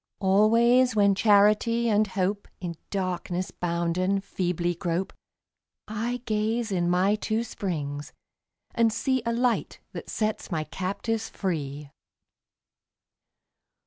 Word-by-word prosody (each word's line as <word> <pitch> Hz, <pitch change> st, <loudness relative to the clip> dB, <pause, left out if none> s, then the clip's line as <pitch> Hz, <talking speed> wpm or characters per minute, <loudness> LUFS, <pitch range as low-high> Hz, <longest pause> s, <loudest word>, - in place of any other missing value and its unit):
Always 230 Hz, +6 st, +4 dB
when 200 Hz, -1 st, +5 dB
Charity 215 Hz, +3 st, +4 dB
and 215 Hz, -1 st, +3 dB
Hope, 195 Hz, +1 st, -2 dB
In 175 Hz, -2 st, -4 dB, 0.2 s
darkness 185 Hz, -1 st, -2 dB
bounden, 175 Hz, +3 st, 0 dB
feebly 175 Hz, -2 st, -1 dB
grope, 175 Hz, +2 st, -2 dB, 0.7 s
I 230 Hz, +3 st, -3 dB
gaze 220 Hz, +1 st, 0 dB
in 175 Hz, -2 st, +1 dB
my 185 Hz, +3 st, +3 dB
two 220 Hz, +1 st, -1 dB
springs 150 Hz, -10 st, -4 dB, 0.6 s
and 230 Hz, -1 st, +3 dB
see 260 Hz, +3 st, 0 dB
A -, -, +2 dB
Light 240 Hz, 0 st, 0 dB
that -, -, -8 dB
sets 215 Hz, -1 st, -2 dB
my 160 Hz, -4 st, -1 dB
captives 200 Hz, +7 st, -3 dB
free. 145 Hz, -6 st, -4 dB
200 Hz, 110 wpm, -26 LUFS, 175-225 Hz, 0.7 s, when